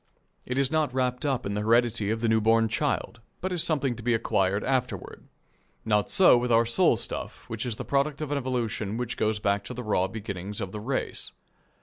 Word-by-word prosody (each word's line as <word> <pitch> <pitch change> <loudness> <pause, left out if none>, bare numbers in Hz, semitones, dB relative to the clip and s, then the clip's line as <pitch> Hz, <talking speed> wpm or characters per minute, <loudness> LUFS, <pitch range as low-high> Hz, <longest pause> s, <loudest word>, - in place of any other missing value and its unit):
It 125 - -2
is 135 -1 +2
not 155 -3 +1
wrapped 125 +2 0
up 130 -3 -1
in 100 - -2
the 105 - -1
heredity 115 -1 +2
of 110 +1 -1
the 115 - +1
new 110 0 +3
born 115 +1 +4
child, 120 -1 -2 0.2
but 185 - -3
is 175 -3 +1
something 140 -6 0
to 115 - -9
be 120 +1 +2
acquired 100 -2 +1
afterward. 130 -2 -2 0.6
Not 105 -2 +2
so 190 - +7
with 120 0 -1
our 115 0 +5
soul 115 - +3
stuff, - - -5
which 115 +2 -4
is 115 - -2
the - - -6
product 140 +1 0
of 155 -2 -4
an 145 - +1
evolution 115 -5 -2
which 125 -1 -3
goes 110 0 0
back 100 -1 0
to 125 - -6
the 125 - -5
raw 95 -4 +1
beginnings 100 -1 -6
of 95 - -4
the 105 - -5
race. 130 +5 -3
115 Hz, 220 wpm, -27 LUFS, 105-130 Hz, 0.6 s, so